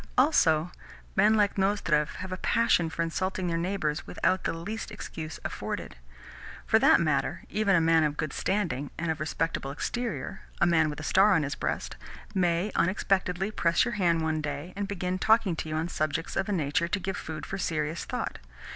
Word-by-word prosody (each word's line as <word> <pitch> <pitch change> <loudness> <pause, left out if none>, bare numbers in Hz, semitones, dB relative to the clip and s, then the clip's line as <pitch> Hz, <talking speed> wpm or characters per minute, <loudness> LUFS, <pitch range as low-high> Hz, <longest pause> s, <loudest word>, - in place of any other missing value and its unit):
Also, 175 - +4 0.4
men 220 - +5
like 205 -2 +2
Nozdrev 185 -7 +1
have 185 0 -6
a 185 - -3
passion 220 -8 +2
for 165 +1 -2
insulting 185 +3 -2
their 170 -1 0
neighbours 165 -3 -1
without 185 - 0
the - - +1
least 205 +7 -5
excuse 160 -1 -7
afforded. - - -4 0.7
(For - - +4
that - - +6
matter, - - 0
even 210 -2 +2
a 165 - +4
man 165 0 +4
of 150 -1 0
good 155 -3 -2
standing 170 -9 -1
and 165 0 -1
of 160 - -4
respectable 155 -2 -2
exterior 215 - -3 0.2
a - - +4
man 160 -2 +3
with 150 - -6
a - - -6
star 195 +5 +5
on 160 - +2
his 140 +1 -2
breast - - -3 0.4
may 180 +1 +1
unexpectedly 190 +1 +1
press 170 -2 +2
your 240 - -2
hand 170 -6 +2
one 160 -1 0
day, 150 +4 -5
and 200 0 -2
begin 185 -2 -2
talking 220 -5 +3
to 160 - -4
you 155 - -2
on 160 +2 -1
subjects 155 -1 -2
of 195 - 0
a - - 0
nature 165 -2 +1
to 200 +4 -1
give 190 0 -3
food 155 -1 -6
for 195 - -5
serious 160 -2 -1
thought. - - -4
170 Hz, 190 wpm, -28 LUFS, 160-195 Hz, 0.7 s, that